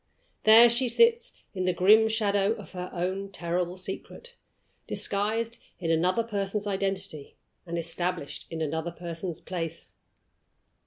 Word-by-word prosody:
There 225 +2 +9
she 240 +2 +1
sits 470 - +3 0.2
in 185 -2 -2
the 180 - +2
grim 215 +5 +5
shadow 205 -2 +2
of 210 -4 -11
her 180 -1 -6
own 190 +2 -3
terrible 175 0 -2
secret, 195 - -7 0.5
disguised 220 +3 0 0.2
in 165 -2 -2
another 180 +7 +2
person's 205 -2 -2
identity, 195 -6 -2 0.3
and 170 0 -3
established 170 -1 -3
in 160 -1 -3
another 160 +2 -2
person's 170 0 -6
place. 165 -3 -6
190 Hz, 125 wpm, -27 LUFS, 170-215 Hz, 0.5 s, There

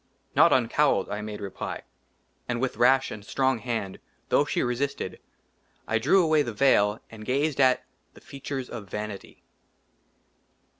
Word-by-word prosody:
" - - -39
NOT - - +6
UNCOWLED," - - +2
I 105 - -3
MADE 105 0 -6
REPLY. 100 -2 -5 0.7
AND 120 -1 -1
WITH 130 -3 -2
RASH 130 +3 +4
AND 105 - -7
STRONG 130 +2 0
HAND, 110 -5 -4 0.3
THOUGH - - +4
SHE - - 0
RESISTED, 125 +3 -2 0.7
I 115 - +1
DREW 175 - +4
AWAY 155 -2 +3
THE 120 -5 -3
VEIL 105 -4 +3
AND 110 -1 -10
GAZED 140 +4 0
AT 130 -1 +3 0.3
THE - - -15
FEATURES 135 -2 -6
OF 105 -5 -7
VANITY. 105 0 -7
120 Hz, 150 wpm, -26 LUFS, 105-135 Hz, 0.7 s, NOT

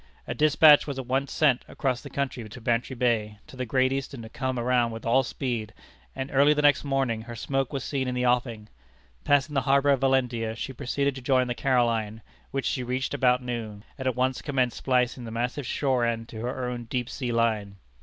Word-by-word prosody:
A - - -3
despatch 155 0 +6
was 140 -2 -4
at 130 - -4
once 135 +2 -1
sent 140 -5 +2
across 130 -3 -2
the - - -9
country 130 -5 -3
to 125 - -10
Bantry 120 +2 -1
Bay 115 -4 0
to - - -14
the 130 -1 -4
Great 130 +2 +2
Eastern 135 -3 -4
to 110 - -9
come 130 +1 -3
around 120 0 +2
with 115 0 -8
all 120 +3 +4
speed, 120 -4 -4 0.4
and 135 +1 -4
early 145 +2 +5
the 150 - 0
next 145 -1 +4
morning 135 -5 0
her 120 +1 -8
smoke 135 +3 -2
was 135 -2 -3
seen 135 -2 -2
in 125 - -2
the 125 0 0
offing. 120 -3 0 0.6
Passing 145 +1 +2
the 135 - +2
harbor 140 +2 +3
of 135 - +3
Valentia, 125 -4 +1
she 130 +3 -5
proceeded 140 +2 -1
to 130 - -8
join 130 0 +2
the 120 - -2
Caroline, 115 -4 0 0.3
which 135 -1 -3
she 130 - -1
reached 130 +3 -2
about 125 -2 +2
noon, 110 -4 -5
and 130 - -4
at 130 - 0
once 130 0 0
commenced 130 -4 0
splicing 125 -1 0
the 115 - -6
massive 120 +3 -3
shore 130 -4 +1
end 115 -1 -1
to 110 - -8
her 125 +1 -3
own 120 -1 -5
deep 120 +1 -2
sea 125 -2 -4
line. 110 -4 0
125 Hz, 215 wpm, -26 LUFS, 115-135 Hz, 0.6 s, despatch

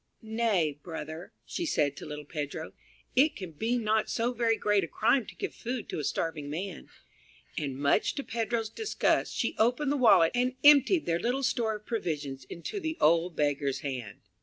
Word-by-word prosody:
"Nay, 215 -10 0
brother," 160 0 -7
she 350 - -4
said 145 - +1
to - - -8
little 150 0 -7
Pedro, 150 +1 -5 0.4
"it 290 +4 +4
can 185 -4 -7
be 225 +10 -1
not 220 -1 +1
so 235 +2 0
very 230 -1 +1
great 205 -2 +2
a - - -3
crime 235 - +2
to - - -10
give 395 - -4
food 245 -1 -5
to - - -3
a - - -3
starving 150 0 -2
man"; 175 +4 -5 0.7
and 140 -3 -3
much 140 +8 +2
to 280 - -3
Pedro's 230 -2 -2
disgust, 440 - 0
she - - 0
opened 250 +6 +2
the - - +2
wallet 200 -10 +6
and 250 +1 +1
emptied 295 +4 +6
their 170 0 +1
little 250 +7 -1
store 230 -4 +1
of 210 0 -10
provisions 145 - -3
into 170 - -6
the 320 -3 -3
old 165 +2 +3
beggar's 145 -2 0
hand. 125 -7 -5
210 Hz, 185 wpm, -29 LUFS, 150-245 Hz, 0.7 s, wallet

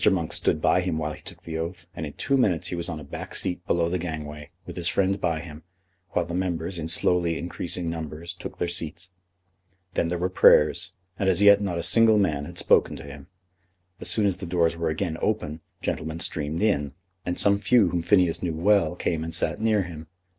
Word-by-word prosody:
Monk 85 -4 -1
stood - - +2
by 90 - +3
him 90 -3 -2
while 75 -1 -2
he - - -12
took - - -12
the 80 -1 -5
oath, 85 +1 -5
and 80 - -4
in 70 - -9
two 140 - 0
minutes 100 - +1
he - - -3
was 85 0 -4
on 80 -2 -4
a - - -9
back - - -8
seat 90 -1 -2
below 85 -1 +2
the 90 +2 -1
gangway, 75 -3 -6 0.2
with - - -8
his 85 -1 +1
friend 95 +1 +1
by 85 -2 0
him, 80 -2 -10 0.5
while 90 - +1
the 85 - -7
members, 90 -1 -2
in 80 - -4
slowly 85 0 +1
increasing 90 0 -2
numbers, 80 +1 -5
took 90 - -9
their 85 - -1
seats. 85 +1 -3 0.8
Then 85 - 0
there 90 +1 -2
were 90 +2 0
prayers, 75 -4 +4 0.3
and 95 - +2
as 95 +2 +3
yet 100 0 +7
not 95 -4 -2
a 85 - -2
single 115 +1 +5
man 75 -8 +1
had - - -10
spoken - - +3
to - - -9
him. 70 -1 -11 0.7
As - - -1
soon 105 - +3
as 95 -3 +1
the 95 - -7
doors 85 -1 +1
were 85 -1 -1
again 80 +1 -2
open 80 -8 -2 0.2
gentlemen 80 +1 -3
streamed 80 +2 0
in, 75 -10 +1 0.3
and 90 - -3
some 100 0 +4
few 110 -3 +4
whom 85 0 -1
Phineas 90 -2 +3
knew 85 -3 -2
well 95 +2 +2
came 80 -2 -2
and 80 0 -4
sat 85 - 0
near 110 -3 +2
him. 80 -3 -9
85 Hz, 220 wpm, -25 LUFS, 80-95 Hz, 0.8 s, yet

